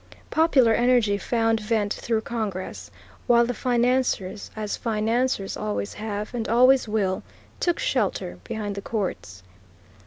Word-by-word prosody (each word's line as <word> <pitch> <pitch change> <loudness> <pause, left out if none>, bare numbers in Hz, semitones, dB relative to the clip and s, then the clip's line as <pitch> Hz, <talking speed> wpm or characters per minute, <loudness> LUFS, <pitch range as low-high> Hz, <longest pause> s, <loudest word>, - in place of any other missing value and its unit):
Popular 280 -8 +4
energy 240 -3 +3
found 225 0 +1
vent 210 -1 0
through 225 -2 -1
Congress, 215 -6 -4 0.4
while 235 -1 +5
the 245 - -2
financiers, 245 -5 0
as 215 -1 -3
financiers 225 -1 0
always 100 -1 -3
have 210 0 -5
and 230 -2 -3
always 255 +2 +5
will, 200 -3 0 0.4
took 345 -1 +1
shelter 190 - -1
behind 210 -2 -4
the 200 - -5
courts. 185 - -4
225 Hz, 125 wpm, -25 LUFS, 205-245 Hz, 0.4 s, while